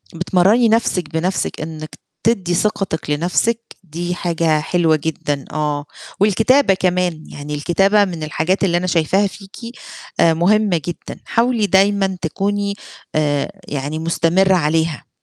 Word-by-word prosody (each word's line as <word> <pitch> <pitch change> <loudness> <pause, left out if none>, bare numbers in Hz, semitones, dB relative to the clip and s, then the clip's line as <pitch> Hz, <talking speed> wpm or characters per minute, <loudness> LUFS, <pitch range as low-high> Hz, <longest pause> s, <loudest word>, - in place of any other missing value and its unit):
بتمرّني 195 +7 +3
نَفْسِك 195 -7 +1
بنَفْسِك 175 +1 -2
إنِّك 155 0 -7 0.3
تدّي 190 -6 +1
ثقتِك 190 -5 -1
لنَفْسِك 180 +9 +1 0.2
دي 175 +1 -4
حاجة 165 -3 0
حلوة 165 0 +2
جدًا، 145 -2 -3
آه، 150 -1 -2 0.3
والكتابة 220 +4 +4
كمان، 180 -3 0
يعني 150 +1 -6
الكتابة 195 +7 +3
من 170 -4 -5
الحاجات 160 +6 -1
اللي 175 -2 +2
أنا 185 +1 -1
شايفاها 185 +4 +2
فيكِ 195 0 -12 0.6
آآ 165 - +5
مُهمّة 190 +2 +2
جدًا، 175 - -6
حاولي 230 -3 +1
دايمًا 195 -1 +2
تكوني 200 +4 -1 0.4
آآ 145 -2 0 0.2
يعني 145 +2 -3
مُستمرة 170 +3 +2
عليها. 160 -1 0
175 Hz, 125 wpm, -18 LUFS, 160-195 Hz, 0.6 s, آآ